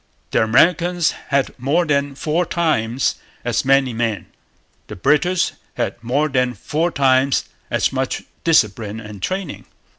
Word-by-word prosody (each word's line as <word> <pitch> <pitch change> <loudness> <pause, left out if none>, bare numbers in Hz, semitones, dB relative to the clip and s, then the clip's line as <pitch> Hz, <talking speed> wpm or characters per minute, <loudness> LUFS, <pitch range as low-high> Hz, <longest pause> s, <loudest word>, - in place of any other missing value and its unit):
The - - +3
Americans 170 +9 +3 0.2
had 140 -1 +1
more 150 +8 +1
than 140 -2 0
four 155 +5 0
times 135 -9 0 0.3
as - - 0
many 135 -2 +3
men. 115 -2 -2 0.6
The 105 - -8
British 150 - +2 0.2
had 120 - -3
more 140 +6 +1
than 125 -3 0
four 160 +3 -1
times 135 -3 +2 0.3
as - - 0
much 130 -1 -2 0.2
discipline 110 -8 +2
and 105 -3 -10
training. 185 - -4
135 Hz, 130 wpm, -20 LUFS, 120-160 Hz, 0.6 s, The